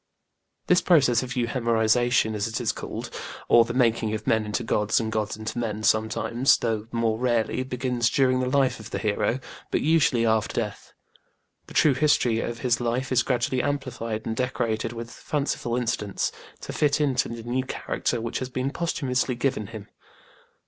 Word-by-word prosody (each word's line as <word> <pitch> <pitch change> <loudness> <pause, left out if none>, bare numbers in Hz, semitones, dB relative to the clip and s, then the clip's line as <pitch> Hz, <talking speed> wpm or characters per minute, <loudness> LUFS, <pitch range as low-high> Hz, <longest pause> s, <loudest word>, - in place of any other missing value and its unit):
This 180 0 +4
process 135 -10 +4
of 130 +1 -5
euhemerisation, 115 -1 +2
as 105 0 -1
it 115 +2 -3
is 120 -3 +1
called, - - -6 0.4
or 115 -1 +6
the 115 - -4
making 115 -3 +2
of 110 - -6
men 110 -1 +1
into 105 +3 -2
gods 105 -1 +1
and 110 -1 -2
gods 110 -1 -2
into 110 +2 -4
men, 110 -2 -3
sometimes, 110 +4 +2
though 110 -2 -2
more 115 -1 0
rarely, 120 -1 +1
begins 125 -2 0
during 130 -1 +2
the 130 0 0
life 135 -2 +2
of 110 0 -9
the - - -3
hero, 110 +3 0 0.3
but - - 0
usually 150 -6 +3
after 110 -1 +1
death. 105 -3 -5 0.7
The - - -13
true 150 - +5
history 130 -5 +2
of 115 0 -4
his 125 -1 +1
life 120 +3 -1
is 130 -1 +4
gradually 125 0 0
amplified 125 -6 -3
and 110 - -2
decorated 115 -2 -1
with 115 0 -7
fanciful 140 -2 -2
incidents, 110 -4 -1 0.3
to - - -6
fit 145 -1 +2
it 140 -4 +1
to - - +1
the 115 -1 -7
new 125 +3 -1
character 125 -2 -2
which 115 0 -3
has 130 - -4
been 130 +1 -2
posthumously 135 -6 -1
given 125 -4 -1
him. 110 -1 -9
120 Hz, 175 wpm, -25 LUFS, 110-130 Hz, 0.7 s, or